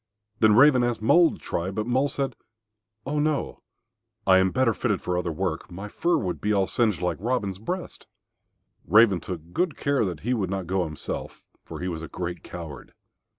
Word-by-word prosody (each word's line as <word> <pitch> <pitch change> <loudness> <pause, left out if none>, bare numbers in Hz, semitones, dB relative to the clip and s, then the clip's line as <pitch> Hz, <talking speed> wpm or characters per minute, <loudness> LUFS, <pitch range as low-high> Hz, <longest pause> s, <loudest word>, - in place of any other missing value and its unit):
Then 110 -1 +5
Raven 130 0 +6
asked 120 -2 -1
Mole 170 +8 +5
to - - -9
try, 85 +2 -3
but 105 +2 -3
Mole 130 +4 +1
said, 135 -3 -2 0.7
"Oh 150 +2 -1
no, 150 -1 -1 0.6
I 95 -1 +6
am 95 0 +3
better 125 +3 +2
fitted 105 -5 -1
for 90 - -2
other 90 -1 -1
work. 90 +1 -3
My 95 +4 -7
fur 170 +9 +1
would 105 - -1
all 100 -1 +3
be - - -3
singed 110 -6 +1
like 90 - 0
Robin's 100 -4 -1
breast." 175 - -5 0.8
Raven 105 -1 +6
took 85 -2 -8
good 180 -4 0
care 140 -3 +1
that 90 -6 -3
he 125 +4 0
would 100 -7 -1
not 95 -1 -3
go 90 +1 0
himself, 75 -1 -6 0.2
for - - -8
he 90 - -2
was 85 -3 -4
a 80 - -6
great 90 0 -5
coward. 80 -6 -9
100 Hz, 195 wpm, -25 LUFS, 90-125 Hz, 0.8 s, Raven